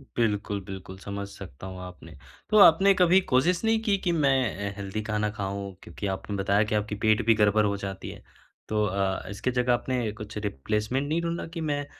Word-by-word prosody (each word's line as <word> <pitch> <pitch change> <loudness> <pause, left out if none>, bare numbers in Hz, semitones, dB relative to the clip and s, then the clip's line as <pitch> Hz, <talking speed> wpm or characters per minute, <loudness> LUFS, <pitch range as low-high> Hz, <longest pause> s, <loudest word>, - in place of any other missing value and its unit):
बिल्कुल, 105 -3 0
बिल्कुल। 95 0 -8
समझ 100 0 -5
सकता 95 -3 -10
हूँ 95 -1 -8
आपने। 90 -1 -11 0.3
तो 215 - +4
आपने 195 0 +7
कभी 185 0 +5
कोशिश 170 - +3
नहीं 225 0 +3
कि, 210 -3 +2
कि 185 -2 -1
मैं 130 - +1
हेल्दी 100 +2 -4
खाना 105 -1 -1
खाऊँ 100 -1 -4
क्योंकि 100 - -6
आपने 95 +1 -4
बताया 100 +2 +2
कि 105 0 -2
आपकी 105 0 -1
पेट 110 0 +3
भी 115 - +6
गड़बड़ 105 0 +3
हो 100 -1 0
जाती 95 -1 -6
है - - -11 0.5
तो 105 0 +1
अ, 95 -1 -1
इसकी 105 +5 -2
जगह 125 0 +2
आपने 120 -2 -1
कुछ 105 0 -8
रिप्लेसमेंट 105 - -2
नहीं 160 +3 0
ढूँढा 170 0 -3
कि 165 - -4
मैं 145 -2 -1
105 Hz, 195 wpm, -27 LUFS, 100-135 Hz, 0.5 s, आपने